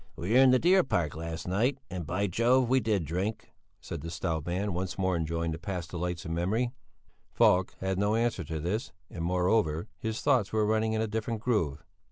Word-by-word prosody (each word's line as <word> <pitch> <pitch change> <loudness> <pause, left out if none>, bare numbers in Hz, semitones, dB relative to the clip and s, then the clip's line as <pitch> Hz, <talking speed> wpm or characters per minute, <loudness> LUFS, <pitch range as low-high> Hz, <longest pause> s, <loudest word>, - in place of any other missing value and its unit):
"We 90 +5 -4
were 125 - +6
in 135 -1 +7
the 130 - +6
Deer 180 +6 +4
Park 85 - -1
last 80 +1 -5
night 115 +9 +1
and, 90 -4 -5
by 95 +4 0
Jove! 120 +6 +3
we 130 +2 +4
did 105 -8 0
drink," 95 +8 -3 0.3
said - - -6
the 85 - -6
stout 80 -2 -3
man, 95 +3 -1
once 90 0 -3
more 95 -1 +1
enjoying 85 0 -1
the 80 - -5
past 90 -2 -5
delights 90 0 -3
in 80 - -3
memory. 105 +9 0 0.6
Falk 90 +1 +3
had 95 0 -1
no 105 +2 +2
answer 115 -5 0
to 80 +1 -4
this, 95 +9 -3 0.2
and 85 - -5
moreover, 90 -2 +1
his 110 +2 -3
thoughts 130 -8 +2
were 110 -1 +2
running 110 +1 +1
in 110 - 0
a - - -1
different 110 +1 -3
groove. 105 - 0
95 Hz, 210 wpm, -29 LUFS, 85-110 Hz, 0.6 s, in